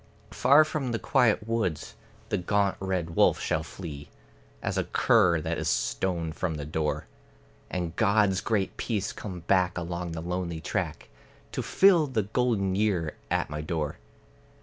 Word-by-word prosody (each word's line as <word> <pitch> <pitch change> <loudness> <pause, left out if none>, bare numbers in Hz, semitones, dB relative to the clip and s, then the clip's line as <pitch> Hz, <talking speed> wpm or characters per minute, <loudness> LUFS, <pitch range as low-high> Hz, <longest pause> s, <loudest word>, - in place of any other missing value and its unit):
Far 140 +7 +6
from 140 -6 -3
the - - +1
quiet 115 -6 +2
woods 110 -9 -1 0.4
the 105 - +1
gaunt 100 +2 +1
red 95 -3 -2
wolf - - +4
shall - - 0
flee, 75 -6 -8 0.5
As - - -1
a - - 0
cur 85 -2 +3
that - - -2
is - - -1
stoned 85 -4 -1
from 85 -4 -2
the 75 -1 -5
door; 75 0 -2 0.6
And 85 -2 -3
God's 105 -3 +3
great 105 -4 -1
peace 105 -4 -2
come 90 -5 -7
back 90 0 +2
along 85 0 -4
the 80 - -4
lonely 90 -2 -3
track, 80 -4 -3 0.4
To - - -2
fill 180 -6 +4
the 115 -6 0
golden 105 -3 0
year 95 -6 0
at - - 0
my 75 0 -3
door. 75 -3 -3
95 Hz, 155 wpm, -27 LUFS, 85-110 Hz, 0.6 s, Far